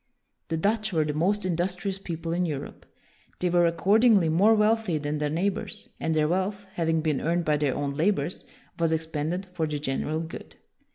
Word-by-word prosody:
The 165 - -1
Dutch 215 +5 0
were 160 -3 +1
the 150 - -2
most 190 +6 +1
industrious 185 +2 -1
people 165 -3 -4
in 180 +1 +1
Europe. 145 -2 -6 0.5
They 180 -1 0
were, 175 -1 +4
accord 190 +6 +3
ingly, 205 -10 +5
more 205 +7 +5
wealthy 215 -5 +2
than 150 0 -3
their 150 0 0
neighbors, 200 +6 -2
and 160 - -1
their 155 -1 +3
wealth, 190 +4 -1
having 165 -1 +1
been 155 -3 0
earned 170 +1 0
by 150 -1 +2
their 145 -3 0
own 140 -1 -2
labors, 160 +1 0 0.4
was 165 -1 +2
expended 160 +3 -2
for 165 -3 -1
the 150 -1 -2
general 150 +2 -2
good. 165 0 -9
165 Hz, 185 wpm, -26 LUFS, 155-195 Hz, 0.5 s, ingly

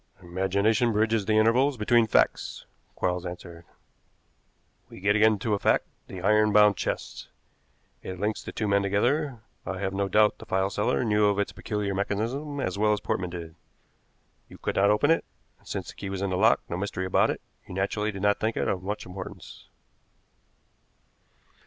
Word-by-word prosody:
"Imagination 100 +6 +1
bridges 110 -1 +1
the 110 -1 +3
intervals 125 +5 +3
between 115 +1 +3
facts," - - +1 0.3
Quarles 90 -1 -1
answered. 85 -1 -8 1.2
"We - - -11
get 100 +2 +2
again 110 0 +4
to 105 +2 -1
a 100 - +1
fact - - +2 0.2
the 90 -2 -8
iron 105 +1 +4
bound 105 0 +6
chest. - - -4 0.7
It 95 -1 -7
links 105 +2 -1
the - - -7
two 110 - -2
men 100 0 +3
together. 120 +6 0 0.2
I 95 - -4
have 95 0 -2
no 100 0 0
doubt 105 +2 +3
the - - -11
file 95 +1 0
seller 105 - 0
knew 105 -1 +3
of 100 -1 +1
its 100 - -1
peculiar 105 -2 -3
mechanism 115 +9 -2
as 95 -6 -2
well 105 0 +3
as 105 - -1
Portman 90 -2 -2
did. 85 -2 -7 1.0
You - - -12
could - - -3
not 100 +1 +4
open 105 +9 +3
it, 165 - +2 0.4
and, - - -23
since - - -4
the - - -9
key 100 - -7
was 95 0 -3
in 100 - -1
the - - 0
lock, 95 - +4
no 85 - -4
mystery 95 -1 -3
about 95 - +3
it, - - -2 0.3
you 90 - -8
naturally 105 +2 -1
did 100 -1 -7
not 100 0 +3
think 110 +1 -1
it - - 0
of 95 - -1
much 105 +3 -4
importance. 90 +1 -9
100 Hz, 185 wpm, -27 LUFS, 95-110 Hz, 1.2 s, bound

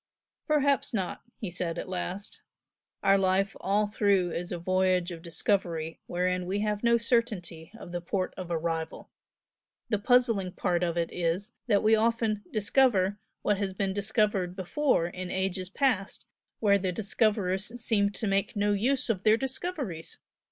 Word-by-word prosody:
"Perhaps 285 -5 +2
not!" 190 -4 -2 0.2
he 200 -5 -5
said, 175 -1 -3
at - - -4
last 185 +2 -4 0.6
"Our 195 0 +5
life 195 +1 +1
all 205 +2 +2
through 200 -4 +2
is 175 +2 -4
a 175 - -2
voyage 185 0 +1
of 165 -1 -7
discovery 165 -2 -1
wherein 180 0 -1
we 200 +2 -1
have 210 -1 -1
no 235 0 +5
certainty 220 -9 -1
of 175 - -10
the 175 0 -3
port 185 +2 -2
of 185 -2 -7
arrival. 165 -1 -3 0.8
The 210 -3 +1
puzzling 230 -5 +3
part 180 -2 0
of 170 -1 0
it 170 -1 0
is 180 +6 -1
that 205 -4 +3
we 215 +1 +5
often 225 -1 +1
'discover' 210 -3 +3 0.2
what 205 -2 +1
has 195 -2 -2
been 190 0 -1
discovered 205 -3 0
before 190 - +1
in 180 +1 -5
past 185 - -3 0.9
ages - - -38 0.3
where 200 -2 +4
the 185 -1 -1
discoverers 205 +1 0
seemed 205 -4 +1
to - - -1
make 195 +1 0
no 205 0 +2
use 255 +7 +1
of 215 -6 0
their 215 +1 +5
discoveries! 265 - -4
195 Hz, 160 wpm, -28 LUFS, 180-215 Hz, 0.9 s, Our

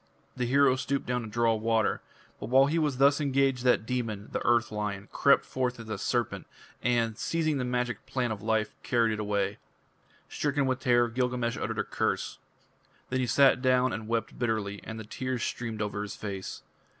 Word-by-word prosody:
The 125 -1 -1
hero 135 0 +4
stooped 140 +1 -2
down 125 0 -1
to 115 - -6
draw 115 +1 +2
water. 110 -1 +1 0.4
But - - -6
while 135 +2 +6
he 160 +4 +1
was 150 -5 0
thus 140 +2 +4
engaged 135 -2 +1
that 125 -3 +3
demon, 110 -5 -3
the - - -2
Earth 120 -1 +2
Lion, 105 -1 -3
crept 140 - +4
forth 125 -2 -2
as 115 -1 -9
a 105 -2 -3
serpent, - - -1 0.3
and, 115 -2 +1
seizing 155 -3 0
the - - 0
magic 125 -1 -2
plant 125 -4 -1
of 100 - -9
life, 110 0 0
carried 115 -2 +2
it 110 - -4
away. 100 -1 -1 0.7
Stricken 145 -1 0
with 130 -1 0
terror, 120 -2 +3
Gilgamesh 125 -1 -1
uttered - - -3
a - - +1
curse. - - -2 0.7
Then 130 - +1
he 125 - 0
sat 135 0 +5
down 130 -1 +3
and 110 +1 -5
wept 115 0 -2
bitterly, 110 -4 -1
and 110 0 -7
the - - -6
tears 130 +3 -3
streamed 115 -3 -3
over 105 0 -3
his 105 -1 -5
face. 100 -2 -6
120 Hz, 190 wpm, -29 LUFS, 110-130 Hz, 0.7 s, while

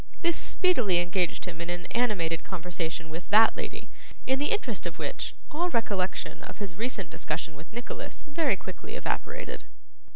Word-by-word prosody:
This 340 -1 +4
speedily 250 - +3
engaged 175 0 +2
him 165 - -5
in 170 - -3
an 175 0 -2
animated 195 -9 +2
conversation 165 -3 -3
with 165 +3 -6
that 220 +2 +8
lady, - - -5 0.3
in 265 +1 +3
the 290 - +3
interest 430 - +1
of - - -5
which, - - -2 0.2
all 345 +4 +1
recollection 200 - 0
of - - -8
his 200 -3 -4
recent 210 -2 -2
discussion 155 0 -3
with 155 +4 -11
Nicholas 240 +2 -5
very 295 -5 +3
quickly 300 - -7
evaporated. - - -2
200 Hz, 160 wpm, -30 LUFS, 175-265 Hz, 0.3 s, that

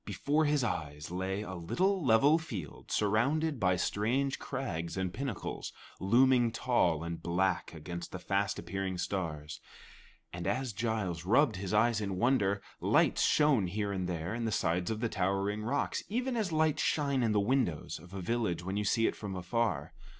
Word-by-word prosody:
Before 150 +2 0
his 145 -2 +2
eyes 75 -8 -3
lay 95 +3 -2
a 95 - -6
little 180 - 0
level 135 +6 +5
field 105 - -7
surrounded 135 +8 +1
by 90 -3 +3
strange 120 +9 0
crags 85 -9 -4
and 95 -1 -2
pinnacles, 135 -5 -4 0.3
looming 120 +4 +4
tall 90 -10 +1
and 85 0 -5
black 90 0 0
against 85 +3 -6
the - - -5
fast 100 +2 -1
appearing 95 +1 -3
stars, 80 -5 -3 0.7
and 85 0 -4
as 130 -2 -1
Giles 100 -6 -2
rubbed 115 - +3
his 95 -1 -4
eyes 110 +1 +3
in 100 -2 -3
wonder, 100 -4 +2 0.2
lights - - +3
shone 145 -10 +4
here 100 +2 -2
and 95 -2 -2
there 85 +2 -3
in 115 0 -2
the 110 - 0
sides 90 -2 0
of 110 0 -2
the 120 - +1
towering 100 +2 0
rocks, 130 +6 -1
even 250 +4 -1
as 215 -6 -1
lights 155 -1 +2
shine 140 -3 +1
in 115 -2 +2
the 105 - +3
windows 110 - 0
of 85 +2 -15
a 95 -1 -5
village 110 -5 -1
when 95 +3 -3
you 105 - 0
see 115 +3 +2
it - - +1
from 100 -3 -6
afar. 110 +5 -1
105 Hz, 175 wpm, -32 LUFS, 90-130 Hz, 0.7 s, level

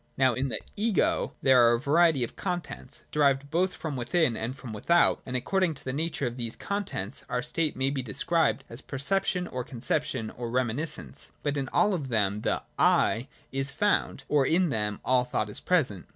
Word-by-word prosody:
Now 130 -2 +4
in 130 +3 -1
the - - -2
' - - -25
Ego 195 - +1
' - - -39
there 130 -2 +6
are - - +4
a - - -2
variety 150 0 +3
of 120 - -5
contents, 175 -4 -5
derived 140 -1 +2
both 180 +3 +1
from 155 -4 -4
within 125 +1 +1
and 115 +4 -3
from 125 -5 -8
without, 170 +11 +3
and 130 - -4
according 180 +5 +1
to - - -10
the 130 - -2
nature 155 -1 -1
of 120 0 -3
these 115 -2 -4
contents 195 - -4
our 125 0 -1
state 155 +2 -1
may 135 +1 +1
be 140 -2 -2
described 140 +6 0
as 115 +3 -10
perception, 180 +7 0
or 125 -4 -4
con 120 -1 -10
ception, 115 -1 -1
or 120 -1 -5
reminiscence. 130 +6 -3
But 145 -1 0
in 135 -2 -2
all 210 - +3
of 150 -7 -3
them 105 -3 +1
the - - -1 0.2
'I' 115 +4 +3 0.2
is/ 135 0 -1
found: 205 +8 0
or 145 -2 +3
in 170 +5 +2
them 105 -5 -1
all 125 -1 +3
thought 110 -3 -2
is - - -5
present. 130 - 0
135 Hz, 205 wpm, -28 LUFS, 120-165 Hz, 0.2 s, there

